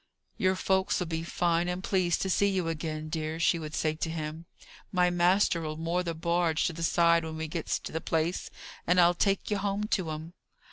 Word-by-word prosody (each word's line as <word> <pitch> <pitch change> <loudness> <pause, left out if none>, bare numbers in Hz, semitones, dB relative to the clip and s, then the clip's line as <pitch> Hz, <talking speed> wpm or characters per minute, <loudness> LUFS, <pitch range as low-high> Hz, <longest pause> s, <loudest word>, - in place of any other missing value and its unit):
"Your 185 0 +2
folks'll 190 -1 +1
be 160 -1 -3
fine 170 0 0
and 180 +1 -3
pleased 185 -4 +1
to 190 - -2
see 200 - +3
you 185 -4 -1
again, 155 -1 -4
dear," 155 0 -3
she 170 0 +3
would 155 -1 -6
say 155 -1 +1
to 160 +1 -3
him. 160 0 -5 0.4
"My 180 -1 +3
master'll 175 -3 +2
moor 165 +2 0
the 170 -2 -3
barge 170 -1 +1
to 175 - 0
the 165 - -7
side 170 0 +3
when 160 0 -5
we 160 0 -3
gets 160 +1 -2
to - - -7
the 160 - -3
place, 165 +3 -1 0.4
and 180 +1 +4
I'll 175 0 +6
take 195 +3 0
ye 205 - +2
home 200 +1 -1
to 185 -7 0
'um." 155 +2 -6
170 Hz, 205 wpm, -29 LUFS, 160-180 Hz, 0.4 s, I'll